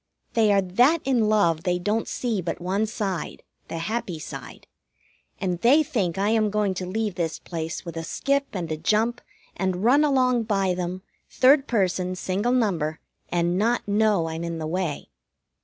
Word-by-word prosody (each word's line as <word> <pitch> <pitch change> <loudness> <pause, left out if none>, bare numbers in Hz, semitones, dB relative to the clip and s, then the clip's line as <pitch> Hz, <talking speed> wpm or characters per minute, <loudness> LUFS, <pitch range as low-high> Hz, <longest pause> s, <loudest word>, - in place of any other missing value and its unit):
They 220 -2 +4
are 200 -1 +3
that 245 - +4
in 240 -5 +2
love 170 -7 +3
they 180 -1 0
don't 210 +5 -1
see 230 -6 -2
but 170 - -4
one 195 +5 0
side 200 -5 -4 0.2
the - - -5
happy 190 0 -3
side 155 - -9 0.7
and 180 -2 -2
they 280 +7 +5
think 195 - -1
I 200 +2 +1
am 220 -1 +2
going 205 -2 0
to 185 0 -5
leave 210 +1 -2
this 165 -2 -2
place 165 0 -5
with 170 -2 -7
a 165 - -4
skip 280 +10 0
and 175 -5 -4
a 155 - -1
jump 225 +8 +1 0.3
and 185 0 -1
run 270 +6 +5
along 255 -5 +2
by 195 -3 +1
them, 180 +1 -4 0.3
third 275 +2 +4
person, 185 -4 0
single 190 +6 -1
number, 175 -11 0 0.3
and 175 +1 +1
not 235 +2 +1
know 205 -4 +2
I'm 160 +1 -4
in 170 -1 -3
the 160 - -4
way. 165 - -3
195 Hz, 175 wpm, -25 LUFS, 175-225 Hz, 0.7 s, they